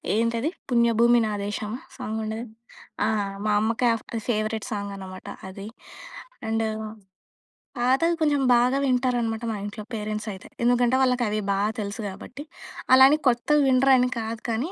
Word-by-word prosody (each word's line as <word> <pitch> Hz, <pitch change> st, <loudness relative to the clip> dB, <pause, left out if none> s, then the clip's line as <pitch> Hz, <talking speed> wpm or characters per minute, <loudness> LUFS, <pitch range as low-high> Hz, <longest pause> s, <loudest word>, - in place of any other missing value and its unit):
ఏంటది? 230 Hz, +7 st, 0 dB, 0.2 s
'పుణ్యభూమి 235 Hz, 0 st, +4 dB
నా 210 Hz, -, -2 dB
దేశం' 210 Hz, +2 st, -4 dB, 0.2 s
సాంగ్ 220 Hz, -3 st, -4 dB
ఉండేది. 225 Hz, +2 st, -4 dB, 0.6 s
ఆ! -, -, +2 dB, 0.4 s
మా 210 Hz, -, +2 dB
అమ్మకి, 230 Hz, +2 st, +1 dB
ఆహ్, 225 Hz, -, -4 dB, 0.3 s
ఫేవరెట్ 215 Hz, -1 st, -1 dB
సాంగ్ 200 Hz, -1 st, -3 dB
అనమాట 185 Hz, -1 st, -9 dB, 0.2 s
అది. 195 Hz, +2 st, -9 dB, 0.8 s
అండు 225 Hz, 0 st, 0 dB, 1.1 s
పాతవి 270 Hz, +8 st, +3 dB
కొంచెం 290 Hz, -2 st, +2 dB
బాగా 250 Hz, +3 st, +3 dB
వింటారనమాట, 245 Hz, -3 st, 0 dB
మా -, -, -4 dB
ఇంట్లో 210 Hz, +1 st, -6 dB
పేరెంట్స్ 215 Hz, 0 st, -4 dB
అయితే, 190 Hz, -, -11 dB, 0.2 s
ఎందుకంటే 245 Hz, +1 st, +3 dB
వాళ్ళకి 250 Hz, -2 st, +2 dB
అవి 215 Hz, 0 st, -1 dB
బాగా 205 Hz, +2 st, 0 dB
తెలుసు 200 Hz, +2 st, -5 dB
కాబట్టి. 260 Hz, +9 st, -9 dB, 0.5 s
అలా 265 Hz, 0 st, +9 dB
అని 305 Hz, +1 st, +3 dB
కొత్తవి 290 Hz, +5 st, +2 dB
వినరు 265 Hz, +1 st, +5 dB
అని 250 Hz, 0 st, +2 dB
కాదు 225 Hz, +1 st, -5 dB
కానీ, 255 Hz, +11 st, -2 dB
230 Hz, 145 wpm, -25 LUFS, 215-250 Hz, 1.1 s, అలా